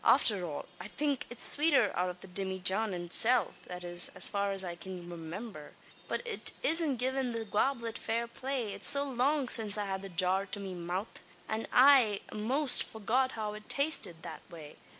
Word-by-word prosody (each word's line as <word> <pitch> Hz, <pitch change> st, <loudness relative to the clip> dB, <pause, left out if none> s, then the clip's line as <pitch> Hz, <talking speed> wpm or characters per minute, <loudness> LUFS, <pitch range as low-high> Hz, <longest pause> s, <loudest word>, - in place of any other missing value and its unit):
"Afther 200 Hz, -5 st, +3 dB
all, 155 Hz, -4 st, -6 dB
I -, -, -8 dB
think, 285 Hz, +4 st, -3 dB
it's 240 Hz, -, -3 dB
swater 285 Hz, -8 st, +3 dB
out 180 Hz, +1 st, -1 dB
av 180 Hz, 0 st, -9 dB
the -, -, -10 dB
dimmyjan 190 Hz, +3 st, -1 dB
itself, 220 Hz, +8 st, +3 dB
that 180 Hz, 0 st, -8 dB
is, 175 Hz, 0 st, +4 dB
as -, -, +6 dB
far 200 Hz, 0 st, -1 dB
as 195 Hz, -1 st, +5 dB
I 175 Hz, -2 st, -5 dB
cyan 180 Hz, -1 st, -9 dB
remimber. 170 Hz, 0 st, -9 dB, 0.3 s
But -, -, -4 dB
it 460 Hz, -2 st, +2 dB
isn't 325 Hz, -, +4 dB
givin' 255 Hz, 0 st, -2 dB
the 225 Hz, -1 st, -4 dB
gawblet 230 Hz, +2 st, -1 dB
fair 230 Hz, +1 st, -2 dB
play. 245 Hz, -2 st, -4 dB
It's -, -, +2 dB
so 280 Hz, 0 st, +4 dB
long 270 Hz, +2 st, 0 dB
since 215 Hz, -4 st, +2 dB
I 205 Hz, -, -2 dB
had 190 Hz, -1 st, -4 dB
the 195 Hz, -, -9 dB
jar 185 Hz, +3 st, 0 dB
to 205 Hz, -, -4 dB
me 195 Hz, -2 st, -6 dB
mouth, 180 Hz, +4 st, -5 dB, 0.3 s
that 220 Hz, +1 st, -4 dB
I 250 Hz, -6 st, +5 dB
a'most 255 Hz, +6 st, +2 dB
forget 245 Hz, +5 st, -1 dB
how 215 Hz, -2 st, -4 dB
it 210 Hz, 0 st, -12 dB
tasted 230 Hz, -, 0 dB
that -, -, -8 dB
way. 160 Hz, -4 st, -12 dB
215 Hz, 190 wpm, -31 LUFS, 185-255 Hz, 0.3 s, as